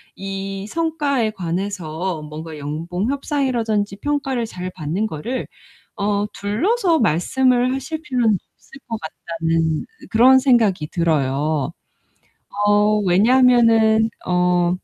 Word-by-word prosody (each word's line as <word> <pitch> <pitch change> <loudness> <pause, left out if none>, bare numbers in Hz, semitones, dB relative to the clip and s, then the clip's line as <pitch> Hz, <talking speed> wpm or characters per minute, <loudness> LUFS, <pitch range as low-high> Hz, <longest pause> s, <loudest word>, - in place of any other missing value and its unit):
이 195 0 -5
성과에 290 -6 0
관해서 180 -3 -3
뭔가 155 +1 -8
연봉 165 - -3
협상이라든지 235 -8 -1
평가를 275 -1 -1
잘 185 -3 -6
받는 165 +8 -2
거를 215 - -4 0.5
어 205 0 0
둘러서 335 - +1
말씀을 250 +10 +2
하실 305 +4 -5
필요는 240 - +1 0.2
없을 270 - -16
것 225 - -3
같다는 165 0 -2 0.2
그런 255 +4 +6
생각이 225 - +2
들어요. 150 -3 0 1.0
어 210 +1 +4
왜냐하면은 225 +1 +4 0.2
어 180 -1 +2
205 Hz, 235 characters per minute, -20 LUFS, 170-250 Hz, 1.0 s, 그런